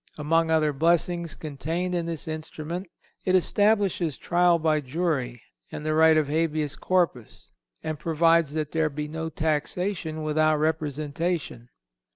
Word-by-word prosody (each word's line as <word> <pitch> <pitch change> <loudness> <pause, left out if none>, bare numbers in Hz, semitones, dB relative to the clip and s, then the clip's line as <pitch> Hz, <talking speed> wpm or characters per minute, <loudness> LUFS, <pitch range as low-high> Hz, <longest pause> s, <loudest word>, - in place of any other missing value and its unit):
Among 165 +2 +1
other 155 -2 +2
blessings 170 +2 +1
contained 160 +5 -3
in 170 -1 -1
this 165 -2 -5
instrument 160 +3 -5 0.4
it 185 - +2
establishes 195 - +2
trial 175 0 +3
by 155 -2 +1
jury 135 -5 -2 0.3
and 150 - -6
the 155 - +1
right 160 0 +5
of 155 -2 +2
Habeas 155 -1 0
Corpus, 165 - -1 0.3
and 155 -2 -3
provides 165 -1 +2
that 155 -2 -2
there 160 -1 +1
shall 140 - -16
be 150 0 -3
no 160 +1 -4
taxation 160 +2 -2
without 155 0 +2
representation. 155 -3 -2
160 Hz, 140 wpm, -26 LUFS, 150-170 Hz, 0.4 s, right